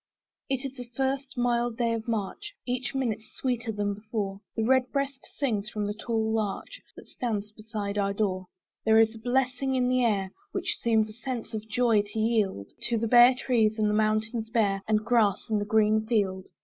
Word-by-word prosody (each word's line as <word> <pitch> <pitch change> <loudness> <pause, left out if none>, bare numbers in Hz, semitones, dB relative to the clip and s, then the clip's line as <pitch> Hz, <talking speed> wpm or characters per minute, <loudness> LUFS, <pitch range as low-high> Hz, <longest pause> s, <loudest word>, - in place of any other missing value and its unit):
It 270 0 -1
is 270 0 -5
the 245 -1 -8
first 270 0 -1
mild 240 -1 +1
day 235 -1 +1
of 225 0 -4
March: 230 - -3
Each 255 +2 -2
minute 230 -5 -1
sweeter 245 -3 -1
than 205 -1 -1
before, 205 -2 -4
The 225 - 0
red 255 +2 +3
breast 275 -1 -2
sings 215 -7 -1
from 210 -1 -3
the 205 - -2
tall 220 0 -1
larch 220 - -3
That - - -13
stands 210 -4 -3
beside 210 -1 -4
our 200 0 +1
door. 190 -3 -1 0.4
There 220 0 +5
is 225 0 +4
a 225 - -10
blessing 260 +2 0
in 250 -1 +2
the 255 0 +3
air, 195 -5 +1 0.2
Which - - -2
seems 220 -2 +3
a - - -13
sense 240 -1 -5
of 220 0 -5
joy 230 -1 +3
to 205 +2 -9
yield 215 - +1 0.2
To 235 - +1
the 230 +1 0
bare 245 +2 +8
trees, 230 -4 +2
and 210 -1 +2
mountains 220 +1 0
bare, 205 -4 +1
And 215 0 +1
grass 225 -4 +3
in 215 - +3
the 205 - -2
green 215 0 +3
field. 195 -5 0
225 Hz, 195 wpm, -28 LUFS, 210-245 Hz, 0.4 s, bare